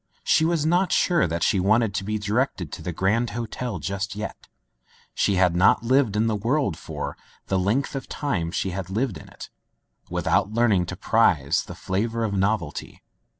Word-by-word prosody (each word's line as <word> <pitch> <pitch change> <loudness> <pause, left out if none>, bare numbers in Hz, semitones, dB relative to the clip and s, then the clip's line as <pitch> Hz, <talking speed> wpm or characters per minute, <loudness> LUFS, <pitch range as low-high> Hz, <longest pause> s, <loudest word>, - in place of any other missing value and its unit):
She 160 - +3
was 165 -2 +1
not 180 +3 +2
sure 170 - +3
that 85 +1 -2
she 95 - +2
wanted 110 +2 +2
to 95 - -2
be 110 +2 -2
directed 105 - -1
to - - -7
the 90 - -4
Grand 105 +8 +1
Hotel 120 -1 -4
just 100 +5 -4
yet. 105 +1 -6 0.7
She 100 - +1
had 90 -2 +3
not 90 +5 +4
lived 125 -3 +2
in 110 +2 +2
the 110 -1 +1
world 120 - 0
for - - -6 0.2
— - - -31
the 95 - +2
length 110 +12 0
of 135 - -5
time 100 - -2
she 95 +2 -2
had 90 0 -5
lived 110 +2 -1
in - - -14
it, - - -11 0.6
without 100 - +1
learning 110 -7 +2
to - - -5
prize - - +2
the - - -9
flavor 115 +5 -2
of 105 -2 -1
novelty. 95 -5 -2
105 Hz, 190 wpm, -24 LUFS, 95-120 Hz, 0.7 s, not